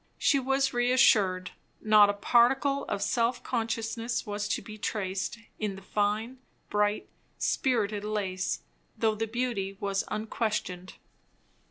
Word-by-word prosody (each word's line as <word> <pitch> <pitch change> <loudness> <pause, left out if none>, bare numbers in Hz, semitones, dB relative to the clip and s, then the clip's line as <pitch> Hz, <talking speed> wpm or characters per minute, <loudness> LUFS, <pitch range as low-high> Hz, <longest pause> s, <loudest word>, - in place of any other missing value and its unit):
She 280 - +3
was 270 +1 +1
reassured; 220 -7 +3 0.3
not 215 -1 +6
a - - +2
particle 270 +6 +3
of 200 - -2
self 240 +1 0
consciousness 230 0 -2
was 205 -1 -3
to - - 0
be 215 -1 -10
traced 195 0 -2 0.2
in 210 -3 -2
the 195 - -11
fine, 215 +6 -1 0.3
bright, 210 0 +1 0.3
spirited 215 -6 0
lace, 195 -4 -2 0.3
though 220 -1 +2
the 225 +1 -2
beauty 220 -5 -2
was 195 -1 -1
unquestioned. 210 -4 -3
215 Hz, 125 wpm, -29 LUFS, 205-240 Hz, 0.3 s, not